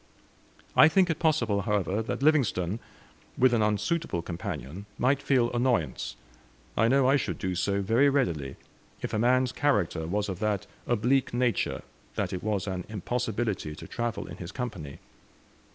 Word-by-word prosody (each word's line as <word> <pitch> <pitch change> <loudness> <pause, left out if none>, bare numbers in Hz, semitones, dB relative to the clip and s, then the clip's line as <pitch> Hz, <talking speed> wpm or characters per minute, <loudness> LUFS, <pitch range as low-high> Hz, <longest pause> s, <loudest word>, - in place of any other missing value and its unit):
I 155 - +9
think 185 +1 +3
it 160 - -3
possible, 120 -11 +2
however, 105 0 0
that 115 +4 -3
Livingstone, 115 - +2 0.6
with 130 -1 +4
an 115 - +3
unsuitable 105 - 0
companion, 85 +2 -6
might 135 +3 +2
feel 130 -4 +2
annoyance. 120 - 0 0.6
I 115 - +3
know 135 +1 +4
I 135 +2 +5
should - - -3
do 95 -2 -2
so 100 +2 0
very 120 +8 +4
readily, 85 - 0 0.5
if - - -3
a 110 - +1
man's 125 +2 +3
character 90 - 0
was 105 +4 -1
of 95 -3 -4
that 105 -3 0 0.2
oblique 120 +2 +1
nature 120 -1 0 0.3
that - - -2
it 90 - -3
was 105 -3 -1
an 95 -2 -3
impossibility 110 -5 -2
to - - -10
travel 120 -1 -3
in - - -9
his 90 +1 -7
company. 95 - -5
110 Hz, 155 wpm, -28 LUFS, 95-130 Hz, 0.6 s, I